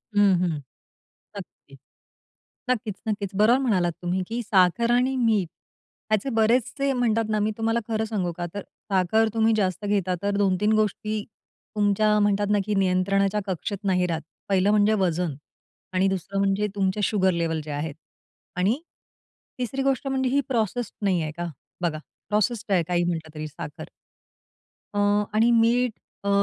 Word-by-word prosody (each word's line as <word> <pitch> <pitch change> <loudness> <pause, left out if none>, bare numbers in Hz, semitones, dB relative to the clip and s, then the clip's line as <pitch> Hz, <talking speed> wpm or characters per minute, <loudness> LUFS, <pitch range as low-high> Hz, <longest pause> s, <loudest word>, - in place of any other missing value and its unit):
हं, 205 -1 +5
हं. 170 -4 0 0.8
नक्की, - - -12 0.9
नक्कीचं-नक्कीचं. 210 -4 -2
बरोबर 235 +5 +5
म्हणालात 190 -10 +1
तुम्ही, 180 +2 0
की 235 +2 -3
साखर 200 +3 +3
आणि 250 +2 +2
मीठ 220 -7 +2 0.6
याचे 215 +5 +1
बरेचसे 245 +4 +1
म्हणतात 230 -3 +1
ना 215 0 +1
मी 210 +1 +1
तुम्हाला 225 +1 +1
खरं 220 -1 -1
सांगू 200 -6 -2
का? 175 - -3
तर 205 - -4 0.3
साखर 195 +4 +3
तुम्ही 225 0 +3
जास्त 185 -1 -1
घेता 195 -3 +1
तर 200 0 0
2-3 200 +1 +2
गोष्टी 215 0 0 0.5
तुमच्या 210 +1 +3
म्हणतात 205 0 +2
ना, 205 - +3
की 210 - -1
नियंत्रणाच्या 195 +2 +2
कक्षेत 190 +2 -3
नाही 180 -2 +2
राहत. 165 -2 -2 0.3
पहिलं 195 0 +3
म्हणजे 210 0 +4
वजन 170 -3 -1 0.6
आणि 185 +1 +3
दुसरं 195 +1 -3
म्हणजे 200 +1 +1
तुमचे 195 +1 0
शुगर 190 -2 +2
लेव्हल 165 -2 -1
जे 155 - -6
आहेत. 145 +1 -3 0.6
आणि 195 +9 +1 0.8
तिसरी 250 +2 -2
गोष्ट 270 0 0
म्हणजे 265 -1 0
ही 280 +2 +2
प्रोसेस्ड 235 -1 -1
नाही 185 -3 +2
आहे 155 - -3
का? 175 0 -3 0.3
बघा 165 -3 -1 0.3
प्रोसेस्ड 210 +1 0
आहे 180 -3 +3
काही 175 -1 +1
म्हंटलं 160 -3 -3
तरी 155 0 -4
साखर. 155 +1 -8 1.1
अ, - - +1 0.3
आणि 225 +3 +4
मीठ 240 +2 +3 0.3
अ, - - +1
205 Hz, 150 wpm, -25 LUFS, 185-225 Hz, 1.1 s, हं